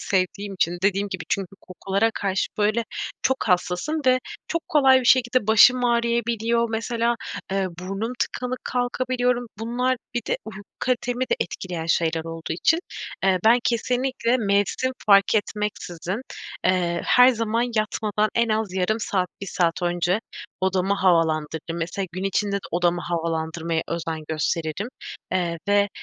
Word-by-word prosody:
sevdiğim 195 +1 -1
için 175 -1 0
dediğim 200 +1 +1
gibi 190 -3 -5
çünkü 195 -3 -1
kokulara 195 +4 -1
karşı, 195 -1 0
böyle, 215 +2 +2 0.4
çok 265 +1 +2
hassasım 180 - +1
ve 255 0 +5 0.3
çok 335 0 -3
kolay 265 -3 +5
bir - - -6
şekilde 250 -2 +4
başım 245 +3 +6
ağrıyabiliyor. 235 -1 +1
Mesela, 230 +1 0 0.4
eee, 195 -1 +1
burnum 195 +6 -3
tıkalı 250 0 -2
kalkabiliyorum. 245 0 0
Bunlar 250 +3 0 0.2
bir 240 - +1
de - - 0
uyku 210 -2 -8 0.2
kalitemi 250 0 0
de - - +4
etkileyen 175 -3 -4
şeyler 165 -1 +1
olduğu 165 -1 -5
için, 310 - +2 0.5
eee, 190 -1 +4
ben 230 +3 +6
kesinlikle 250 +1 +1
mevsim 205 +4 +1
fark 200 +1 +6
etmeksizin, 205 -2 -2 0.4
eee, 175 -2 +1
her 250 0 +7
zaman 230 -1 +1
yatmadan 215 0 0
en 235 0 +2
az 215 -3 0
yarım 205 +4 0
saat, 185 -4 0
1 200 - -5
saat 175 -1 0
önce 175 +3 +1 0.4
odamı 190 +1 +1
havalandırırım. 165 -3 +1
Mesela, 175 +4 -3
gün 185 +2 -4
içinde 200 +1 0
de 200 - -6
odamı 175 0 +1
havalandırmaya 165 -1 -2
özen 165 -1 -3
gösteririm, 160 +5 -2 0.4
eee, 170 -2 0
ve 205 0 +4
200 Hz, 140 wpm, -24 LUFS, 175-235 Hz, 0.5 s, her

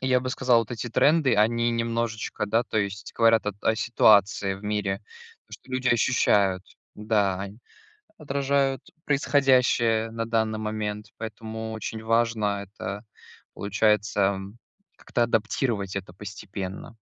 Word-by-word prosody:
я 130 -1 +2
бы 130 0 -3
сказал, 125 -3 +3
вот 115 - -6
эти 120 +1 -4
тренды, 145 +2 +3
они 115 +2 +2
немножечко, 115 -2 -2
да, 115 +3 +2
то - - -5
есть 100 +1 -3
говорят 115 -2 +4
о 105 - 0
т 100 - -29
о 110 - +2
ситуации 100 -4 +3
в 95 - -12
мире. 105 -2 -1 0.5
То, - - -24
что 130 - -17
люди 130 0 0
ощущают, 100 -6 +2 0.3
да. 105 -3 0
Они 100 +3 -7 0.6
отражают 140 -2 0 0.2
происходящее 125 -6 +2
на 115 0 -3
данный 110 -1 0
момент, 105 -1 -4
поэтому 110 0 -6
очень 110 0 -5
важно 110 -3 +1
это, 100 +1 -7 0.5
получается, 105 -1 +1 0.6
как-то 120 - -1
адаптировать 110 -3 -1
это 95 -2 -8
постепенно. 100 +2 -7
110 Hz, 135 wpm, -25 LUFS, 105-120 Hz, 0.6 s, говорят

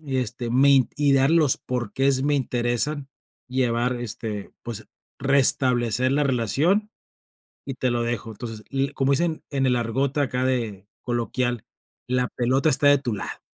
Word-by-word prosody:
y 140 -4 -4
este 120 0 -3
me 135 +1 +4
y 145 -1 +2
darle 135 +4 +3
los 150 -5 +4
por 125 -4 -4
qués 135 0 +1
me 145 0 +1
interesan 130 +2 0 0.4
llevar, 125 -1 0
este, 110 -3 -5
pues 110 -2 -6 0.3
restablecer 130 -3 +3
la 145 +1 +1
relación 145 - +1 0.8
y 135 - -5
te 130 - -1
lo 120 0 -1
dejo". 115 -1 -3
Entonces, 110 0 -8
le 135 0 -1
y 140 - -8
como 135 +1 +1
dicen 165 +2 0
en 135 -2 0
el 125 - +2
argot 130 +4 -1
acá 130 -2 -1
de 115 -7 -2 0.2
coloquial, 120 -1 -2 0.4
la 125 0 0
pelota 130 +5 +1
está 145 0 +3
de 145 - +6
tu 120 -4 -3
lado. - - -5
130 Hz, 165 wpm, -23 LUFS, 120-140 Hz, 0.8 s, de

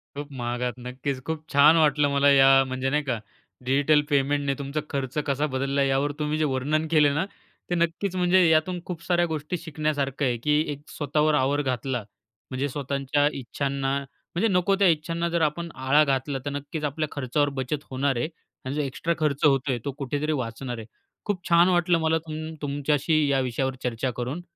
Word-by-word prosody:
खूप 145 0 -6
महागात. 120 +1 -2
नक्कीच 130 +2 -4
खूप 160 -1 -3
छान 145 +3 +6
वाटलं 150 -2 +3
मला 140 0 +4
या 135 0 +6
म्हणजे 130 +1 -2
नाही 150 +1 +1
का 125 -5 -2 0.5
डिजिटल 145 +3 +3
पेमेंटने 140 0 +1
तुमचा 140 +2 -3
खर्च 135 -1 -3
कसा 140 +2 +1
बदलला 135 +1 +1
यावर 135 +2 +1
तुम्ही 150 0 -1
जे 155 - +1
वर्णन 150 +5 0
केले 150 -2 +4
ना 165 +5 0 0.4
ते 175 - +1
नक्कीच 170 +3 -1
म्हणजे 180 0 +4
यातून 160 +3 +2
खूप 170 -2 -6
साऱ्या 175 -1 +2
गोष्टी 160 +1 -3
शिकण्यासारखं 150 -3 -2
आहे, 120 -2 +1
की 150 +5 +2
एक 145 0 -7
स्वतःवर 150 +1 0
आवर 145 +1 +2
घातला 130 -2 -2 0.5
म्हणजे 130 +2 -1
स्वतःच्या 140 +1 0
इच्छांना 135 +2 -2
म्हणजे 140 +8 -4
नको 195 0 +2
त्या 195 - +5
इच्छांना 165 +1 0
जर 170 0 0
आपण 160 +2 0
आळा 135 +3 +4
घातला 135 -1 -1
तर - - -1
नक्कीच 145 +2 -5
आपल्या 150 +2 -1
खर्चावर 145 +1 0
बचत 145 +3 -3
होणार 135 0 0
आहे 120 - 0 0.4
आणि 130 - -3
जो 150 - 0
एक्स्ट्रा 140 +5 -2
खर्च 150 -2 0
होतोय 135 -3 +2
तो 140 - -1
कुठेतरी 145 +2 -2
वाचणार 125 -2 -4
आहे. 110 - -7 0.4
खूप 200 -4 -2
छान 170 +2 +6
वाटलं 175 -1 +3
मला 160 0 +2
तुम 155 +1 -5
तुमच्याशी 145 +1 +1
या 135 -1 +2
विषयावर 130 +1 -1
चर्चा 125 +1 -1
करून 125 +8 -3
145 Hz, 180 wpm, -25 LUFS, 135-155 Hz, 0.5 s, छान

